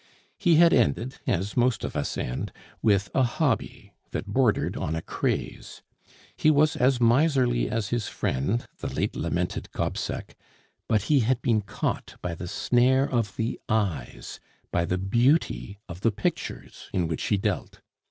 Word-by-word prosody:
He 170 -2 +4
had 170 +1 +6
ended, 115 - +1
as 95 +3 0
most 125 -1 +2
of - - -4
us - - -2
end, 60 +1 -3 0.3
with 100 -2 +2
a 135 - +3
hobby 120 -4 -1 0.2
that - - -4
bordered - - +1
on 80 - -2
a 80 - -2
craze. - - -3 0.5
He 155 - +3
was 150 0 +4
as 125 0 +3
miserly 125 0 +3
as 110 -1 -2
his 120 -3 -1
friend, 95 - -1
the - - -4
late - - -1
lamented 85 +2 -2
Gobseck; - - -3 0.5
but 105 -3 +2
he 145 +3 +3
had 125 +1 +2
been 110 -3 +2
caught 100 - -3
by 90 - -3
the 90 +2 -6
snare 130 +7 +3
of 115 -5 -1
the 115 +1 -2
eyes, 80 - -2 0.3
by 85 - +1
the 90 - -1
beauty 120 - +1
of 85 +1 -8
the 115 - +3
pictures 100 -1 -4
in 90 -3 0
which 80 -2 -3
he 105 - +2
dealt. 95 - -2
115 Hz, 160 wpm, -26 LUFS, 95-125 Hz, 0.5 s, had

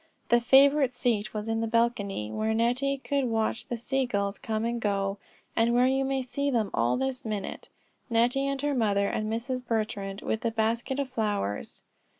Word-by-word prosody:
The 240 0 +5
favorite 270 +1 +5
seat 220 -4 0
was 215 0 -4
in 225 0 0
the 225 - 0
balcony, 215 - 0
where 220 +1 0
Nettie 250 +5 +1
could 275 0 -1
watch 225 +1 -1
the 240 - -3
sea 260 +3 0
gulls 200 -3 -1
come 220 0 -2
and 235 0 -2
go, 195 -1 -1 0.4
and 230 +1 +3
where 245 +1 +5
you 265 +1 +2
may 270 -1 -1
see 280 +3 -2
them 225 -6 0
all 120 +1 +2
this 265 0 -2
minute, 210 -3 -5 0.4
Nettie, 245 +4 +2
and 275 0 -1
her 290 0 +1
mother, 205 -5 +2
and 215 0 -2
Mrs. 250 +3 -2
Betrand, 215 -4 -2
with 220 - -1
her 235 - +1
basket 230 +4 -1
of 280 -1 -1
flowers. 210 - -2
230 Hz, 185 wpm, -28 LUFS, 215-260 Hz, 0.4 s, The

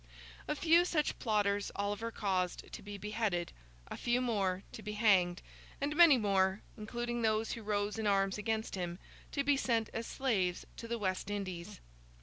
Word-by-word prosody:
A - - 0
few 335 +3 +5
such 315 -4 0
plotters 205 -3 +1
Oliver 205 +3 -2
caused 185 -5 -2
to - - -6
be 205 0 -7
beheaded, 205 -4 -2 0.3
a - - -6
few 240 0 +1
more 200 -6 0
to - - -8
be 210 0 -5
hanged, 190 -5 +3 0.4
and 290 +2 -1
many 330 -5 +8
more, 195 -2 +2
including 240 +2 -3
those 220 0 +1
who 230 - -4
rose 205 0 -1
in 220 - 0
arms 195 0 +2
against 220 +1 -2
him, 175 -2 -3 0.3
to 280 - 0
be 285 0 +4
sent 230 -5 0
as 225 +1 -3
slaves 195 -10 0
to 230 - -7
the 235 0 -2
West 190 -2 -2
Indies. 185 - -5
210 Hz, 170 wpm, -34 LUFS, 195-235 Hz, 0.4 s, many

